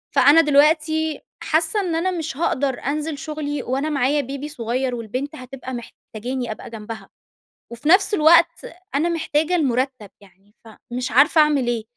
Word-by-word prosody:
فأنا 300 +4 +7
دلوقتي 315 +1 +2 0.2
حاسّة 325 +6 +1
إن 360 -5 -1
أنا 355 +3 0
مش 320 -5 -4
هاقدر 280 -5 -1
أنزل 300 +2 -2
شغلي 295 -2 -4
وأنا 270 +5 -2
معايا 285 0 +1
بيبي 280 +3 -6
صغير 250 -1 -2
والبنت 255 +7 -5
هتبقى 260 -1 -9
محتاجاني 240 +1 -6
أبقى 215 - -8
جنبها. 220 -2 -9 0.6
وفي 240 +6 -4
نفس 375 +4 +5
الوقت 335 0 +4 0.3
أنا 315 +5 +1
محتاجة 320 0 0
المُرتّب. 255 - -1
يعني 200 +1 -23
فمش 245 +3 -6
عارفة 300 +4 +5
أعمل 290 -5 +2
إيه؟ 235 -2 -1
285 Hz, 145 wpm, -21 LUFS, 245-315 Hz, 0.6 s, فأنا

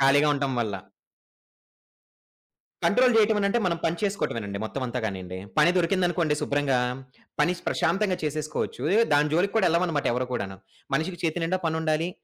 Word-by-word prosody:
ఖాళీగా 140 +2 +5
ఉంటం 140 -1 -1
వల్ల. 105 -3 -2 2.1
కంట్రోల్ 250 +2 +4
జేయటం 215 0 +4
అనంటే 200 +4 +2
మనం 170 -2 0
పని 165 +1 +1
చేసుకోటమే 200 - -1
నండి 100 0 -5
మొత్తం 130 +4 -4
అంతా 125 +1 -3
గానియండి. 95 -3 -4 0.2
పని 160 +3 +6
దొరికిందనుకోండి 175 -3 +1
శుభ్రంగా 140 -3 +1 0.6
పని 180 - +3 0.2
ప్రశాంతంగా 185 +2 +1
చేసేసుకోవచ్చు 155 -3 -3
ఏయో 230 - +5
దాని 150 +1 +3
జోలికి 185 +5 +2
కూడా 195 - +4
ఎళ్ళం 170 +2 +2
అన్నమాట 150 -4 -1
ఎవరు 125 +1 -1
కూడాను. 95 -5 -3 0.4
మనిషికి 165 +4 -1
చేతి 165 +1 -1
నిండా 185 +3 0
పనుండాలి. 160 +1 0
160 Hz, 150 wpm, -26 LUFS, 135-180 Hz, 2.1 s, పని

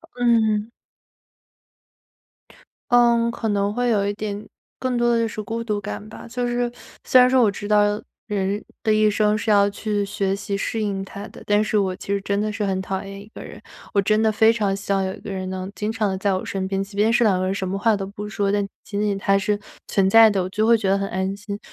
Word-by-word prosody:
嗯。 225 -3 +2 2.2
嗯， 235 -1 +4
可 225 -2 -3
能 200 0 0
会 245 +1 0
有 205 -3 +2
一 205 - -1
点 205 0 -5 0.3
更 255 -2 -1
多 240 0 +2
的 230 - +2
就 230 - +1
是 220 -1 -5
孤 225 +3 -4
独 210 -3 -2
感 210 +1 -6
吧。 215 - -11
虽 245 +2 -4
然 240 0 -1
说 245 0 0 0.3
虽 255 - +5
然 250 0 +6
说 260 -1 +4
我 215 - +4
知 205 +1 -7
道 210 0 +3 0.3
人 200 -1 -1 0.2
的 215 - +2
一 215 0 +4
生 210 0 +2
是 220 - -1
要 200 -1 +5
去 205 0 -2
学 195 -1 -1
习 200 0 -3
适 220 +2 -2
应 195 -2 -2
它 200 +2 -8
的， - - -13
但 205 0 +3
是 215 0 0
我 190 -2 +1
其 - - -11
实 200 0 0
真 200 0 -1
的 215 +1 0
是 210 0 -3
很 190 -1 -1
讨 190 0 -3
厌 195 0 -8
一 200 - -12
个 - - -8
人。 - - -11 0.3
我 200 - +3
真 215 +2 +2
的 220 - +3
非 220 +1 +4
常 205 -4 0
希 200 0 -2
望 195 -1 +1
有 190 - -2
一 - - -11
个 - - -9
人 185 -1 -4
能 185 0 -5
经 210 +1 -2
常 225 -2 0
地 190 - -2
在 195 0 0
我 185 - -2
身 190 -1 -3
边， 195 0 -1
即 195 +1 -7
便 215 +3 +3
是 235 0 +3
两 195 -4 +3
个 185 - -1
人， 190 - 0
什 190 -1 -3
么 195 - -2
话 220 +2 +3
都 195 - -4
不 210 +1 -7
说， 200 0 -1
但 205 0 +1 0.2
仅 205 0 -3
仅 205 -2 0
他 195 0 +2
是 205 +1 0 0.3
存 190 -1 +2
在 225 +2 +8
的， 195 -2 0
我 180 - -2
就 215 +3 0
会 230 +1 +5
觉 200 -3 -1
得 195 - +3
很 195 0 -3
安 190 +1 -2
心。 205 0 -7
205 Hz, 275 characters per minute, -22 LUFS, 195-220 Hz, 2.2 s, 在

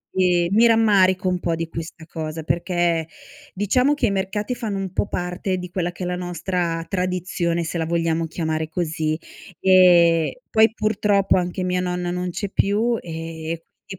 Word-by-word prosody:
E 180 -2 +3
mi 230 +3 +5
rammarico 195 -5 +4
un 180 -1 +1
po' 170 -1 -1
di 165 0 -3
questa 165 0 -8
cosa, 160 -1 -5
perché 170 -1 0 0.5
diciamo 250 +9 +2
che - - 0
i - - +1
mercati 200 +5 -2
fanno 215 -5 -3
un 190 -1 -4
po' - - 0
parte 180 +1 -2
di 180 0 -6
quella 175 -1 -1
che 180 - -8
è - - -2
la 180 0 -2
nostra 175 -1 -2
tradizione, 180 -2 -1
se 165 +2 -4
la 160 - 0
vogliamo 165 -1 0
chiamare 160 -1 -2
così. 160 -2 -2 0.4
Ehm, 175 -3 +5 0.2
poi 220 0 +5
purtroppo 210 -2 +2
anche 180 +1 -2
mia 180 0 0
nonna 180 -1 -2
non 180 0 -2
c'è 195 +3 -4
più 220 +4 +1
e 165 -1 -6 0.3
e 190 -2 -8
180 Hz, 170 wpm, -22 LUFS, 165-190 Hz, 0.5 s, mi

